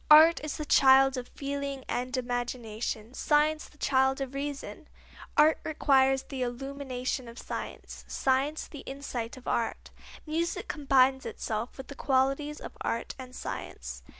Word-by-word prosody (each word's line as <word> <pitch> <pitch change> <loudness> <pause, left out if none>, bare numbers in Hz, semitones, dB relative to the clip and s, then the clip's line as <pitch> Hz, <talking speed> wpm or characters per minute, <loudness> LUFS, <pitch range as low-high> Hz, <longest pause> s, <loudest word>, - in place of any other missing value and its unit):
Art 315 +1 +8
is 305 - -3
the 305 - -4
child 270 -1 +6
of 250 -1 -4
feeling 280 -1 -4
and 255 +2 -2
imagination; 240 -2 -3
science 305 +2 +2
the 300 - -22
child 265 -1 +2
of 270 -1 -4
reason. 280 0 -5 0.5
Art 305 +1 +6
requires 270 -3 +3
the 270 -2 -6
illumination 255 0 -3
of 235 +1 -10
science; - - -6
science 275 +4 +1
the 290 - -9
insight 260 -4 -5
of 255 - -13
art. 230 - -1 0.3
Music 330 +2 -1
combines 270 -3 +4
within - - -3
itself 220 +2 -3
the 265 +1 -9
qualities 275 +2 +1
of - - -9
art - - -2
and 255 0 -9
science. - - -6
270 Hz, 145 wpm, -29 LUFS, 255-285 Hz, 0.5 s, Art